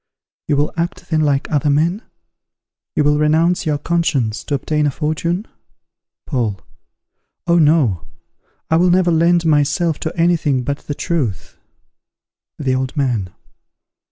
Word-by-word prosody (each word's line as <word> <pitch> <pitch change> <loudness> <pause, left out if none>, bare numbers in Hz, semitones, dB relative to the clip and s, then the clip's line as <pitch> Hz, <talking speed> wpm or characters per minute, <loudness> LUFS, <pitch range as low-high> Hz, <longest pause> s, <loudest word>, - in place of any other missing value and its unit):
_ - - -63 0.4
You 145 - +2
will 145 +1 0
act 170 0 -4
then 155 -1 +2
like 145 -2 +1
other 145 -1 +1
men? 165 +8 +1 0.9
you 150 - +2
will 150 0 +2
renounce 160 +3 +2
your 150 -1 +1
conscience 145 -9 -1
to 145 - -1
obtain 150 +2 0
a - - +2
fortune? 165 - -2 0.8
Paul. 115 - -2 0.9
Oh 170 -1 +3
no! 145 - +2 0.6
I 160 - +5
will 180 +2 +3
never 180 0 +3
lend 170 +1 +3
myself 155 +2 +1
to 160 - -5
any 170 +1 +4
thing 135 -5 0
but 140 +2 -3
the 145 - -3
truth. 135 - -3 1.0
_The 130 -3 0
Old 130 +2 -3
Man. 120 -9 0
150 Hz, 145 wpm, -18 LUFS, 140-170 Hz, 1.0 s, I